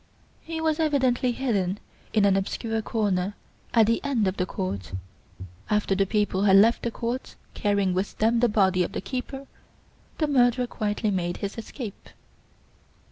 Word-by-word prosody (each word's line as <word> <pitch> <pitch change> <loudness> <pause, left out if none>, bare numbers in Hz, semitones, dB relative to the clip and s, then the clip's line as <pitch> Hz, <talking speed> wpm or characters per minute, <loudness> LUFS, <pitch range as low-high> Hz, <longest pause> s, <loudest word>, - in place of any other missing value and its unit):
"He 325 0 -5
was 320 0 0
evidently 260 -5 +2
hidden 205 -7 -1 0.3
in 210 -2 +3
an 195 -1 +4
obscure 225 +3 -1
corner 205 -3 -1 0.4
at 225 -2 +5
the 230 +2 +1
end 255 -8 +1
of 185 - -2
the 180 - 0
court. 95 - -4 0.8
After 210 -2 +1
the 195 0 +1
people 205 -2 0
had 195 -1 +6
left 220 +4 +5
the 235 - -1
court 235 +3 -4 0.2
carrying 200 -3 +1
with 190 +3 -2
them 230 +2 +3
the 240 0 +3
body 190 -3 +3
of 175 - -1
the - - -3
keeper, 270 +1 -5 0.7
the 310 - +1
murderer 250 -3 +3
quietly 215 -2 -2
made 175 -2 -1
his 200 0 -4
escape." 225 -1 -8
215 Hz, 160 wpm, -26 LUFS, 195-245 Hz, 0.8 s, had